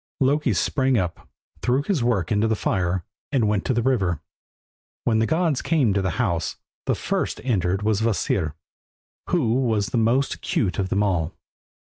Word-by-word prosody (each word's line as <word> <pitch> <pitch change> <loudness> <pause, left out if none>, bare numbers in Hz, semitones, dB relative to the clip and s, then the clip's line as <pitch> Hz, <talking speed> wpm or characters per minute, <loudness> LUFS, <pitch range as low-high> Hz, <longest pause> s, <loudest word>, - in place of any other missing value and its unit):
Loki 145 +3 +2
sprang 130 -3 +1
up, 90 -4 -3 0.3
threw 130 +3 +1
his 160 - 0
work 100 -8 +1
into 105 +1 +3
the 110 - +1
fire, 90 -3 -1 0.3
and 125 -6 +2
went 105 -2 +1
to - - +1
the 120 - +1
river. 100 - +1 0.8
When 110 -2 +2
the 110 - +2
gods 160 -3 +1
came 140 -11 +2
to 100 - +1
the 95 - 0
house, 85 - 0 0.3
the - - +2
first - - -1
that - - -12
entered 95 -5 +1
was 110 -1 +1
Kvasir, 95 -8 0 0.7
who 140 -11 +2
was 115 -5 +1
the 120 - 0
most 120 +5 +2
acute 100 -5 -1
of 95 -1 -1
them 100 +2 +2
all. 90 -6 0
110 Hz, 175 wpm, -24 LUFS, 95-130 Hz, 0.8 s, into